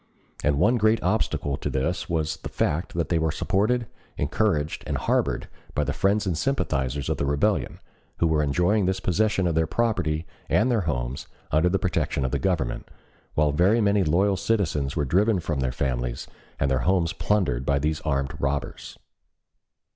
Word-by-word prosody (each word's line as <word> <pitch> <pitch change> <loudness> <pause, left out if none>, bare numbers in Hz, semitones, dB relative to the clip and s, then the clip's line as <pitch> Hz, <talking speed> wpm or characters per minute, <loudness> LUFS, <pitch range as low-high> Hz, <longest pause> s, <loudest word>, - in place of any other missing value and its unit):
And 75 -1 +2
one 120 - +3
great 110 0 +3
obstacle 90 -8 0
to - - -3
this 80 +9 -2
was 80 -2 -1
the - - -7
fact 80 +5 -1
that 85 -1 -1
they 85 - +2
were 80 -1 +1
supported, 115 +9 +1 0.3
encouraged, 75 0 0
and - - -1
harbored - - 0 0.3
by 75 - +2
the - - -2
friends 100 +2 +1
and 90 -3 0
sympathizers 70 - -1
of - - -1
the - - -1
rebellion, 70 - 0 0.4
who - - +2
were 80 -2 +2
enjoying 90 +7 +2
the 95 0 0
possession 95 +1 +1
of 85 - +1
their 80 0 +1
property 80 -7 0 0.2
and 120 +4 +3
their 115 -3 +2
homes - - -3 0.2
under 80 +4 +3
the 95 - +2
protection 90 -7 -1
of 65 - -2
the - - 0
Government, 85 -10 -1 0.5
while 75 -1 +3
very 95 +10 +3
many 100 -2 +3
loyal 95 +5 +2
citizens 80 -12 0
were 75 -3 0
driven 100 - +2
from 80 -4 -2
their 65 -1 0
families, 60 -2 -2 0.3
and 70 -1 +1
their 65 - +2
homes 90 -3 +2
plundered 75 -13 0
by 70 +1 +1
these 75 +2 -1
armed 70 -3 -1
robbers. 70 0 -3
80 Hz, 175 wpm, -25 LUFS, 70-100 Hz, 0.5 s, one